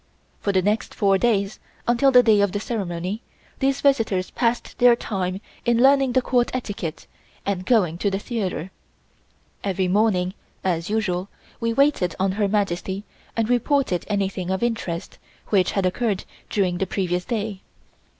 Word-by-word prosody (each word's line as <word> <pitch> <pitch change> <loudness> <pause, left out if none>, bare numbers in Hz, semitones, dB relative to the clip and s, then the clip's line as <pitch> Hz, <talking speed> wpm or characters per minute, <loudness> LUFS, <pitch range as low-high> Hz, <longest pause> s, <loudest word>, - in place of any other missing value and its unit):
For 200 - 0
the 190 -1 +2
next 210 +3 0
four 195 -2 +3
days, 205 -3 +1 0.3
until 245 +3 +4
the 250 -2 +7
day 215 -3 +5
of 200 -2 +1
the 205 - -1
ceremony, 195 -2 -3 0.4
these 270 0 +1
visitors 220 -9 +2
passed 235 -1 -1
their 245 -1 +7
time 190 -5 -3 0.2
in 235 -1 +2
learning 270 0 +5
the 255 0 +3
Court 245 -1 +2
etiquette 200 -9 -4 0.4
and 185 -2 -2
going 180 -9 +3
to 200 - +1
the 195 - -1
theatre. 195 - -3 0.9
Every 190 -2 0
morning, 185 -2 +2 0.3
as 170 -2 -1
usual, 200 -3 -1 0.3
we 230 0 0
waited 275 -8 +2
on 190 0 +2
Her 205 +1 +1
Majesty 195 -1 -1 0.3
and 225 -1 +2
reported 245 - +1
anything 195 -3 -1
of 190 +4 -1
interest 225 -8 -3 0.3
which 190 -3 +3
had 195 -2 +1
occurred 200 +1 0 0.3
during 180 -4 0
the 195 - 0
previous 180 -1 -1
day. 215 -3 -3
200 Hz, 155 wpm, -23 LUFS, 185-235 Hz, 0.9 s, the